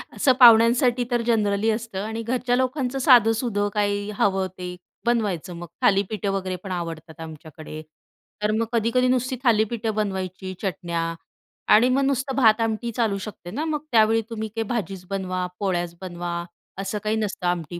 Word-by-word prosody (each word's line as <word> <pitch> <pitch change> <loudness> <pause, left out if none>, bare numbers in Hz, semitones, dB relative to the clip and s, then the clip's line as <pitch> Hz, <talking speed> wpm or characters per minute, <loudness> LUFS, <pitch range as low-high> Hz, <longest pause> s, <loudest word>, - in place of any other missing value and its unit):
असं 260 - +4
पाहुण्यांसाठी 240 +1 +6
तर 240 -1 +2
जनरली 210 -1 +2
असतं 215 -3 -4
आणि 225 +1 -4
घरच्या 245 +1 0
लोकांचं 260 0 -1
साधंसुधं 225 -4 +4
काही 205 0 0
हवं 195 -1 +2
ते 180 0 -6 0.3
बनवायचं. 200 -7 0
मग 175 0 -8
थालीपीठं 200 0 +1
वगैरे 185 -1 -2
पण 190 - -6
आवडतात 165 -2 -6
आमच्याकडे, 155 -1 -9 0.6
तर 210 - +2
मग 225 +1 +1
कधी-कधी 235 +3 +2
नुसती 255 0 +1
थालीपीठं 220 -1 +1
बनवायची, 190 -2 -3
चटण्या 170 -3 -2 0.6
आणि 230 +4 +6
मग 270 +2 +2
नुसतं 270 0 -1
भात-आमटी 225 -1 +2
चालू 215 -3 0
शकते 190 -3 -8
ना. 300 +9 -3
मग 305 -2 -1
त्यावेळी 225 0 +4
तुम्ही 220 -1 -4
काही 225 +2 -3
भाजीच 195 -6 -3
बनवा, 185 -2 -2
पोळ्याच 175 -3 -1
बनवा 175 -1 -5 0.5
असं 200 +2 -3
काही 215 +1 0
नसतं, 205 -4 -2
आमटी 175 -1 -2
215 Hz, 150 wpm, -24 LUFS, 185-235 Hz, 0.6 s, पाहुण्यांसाठी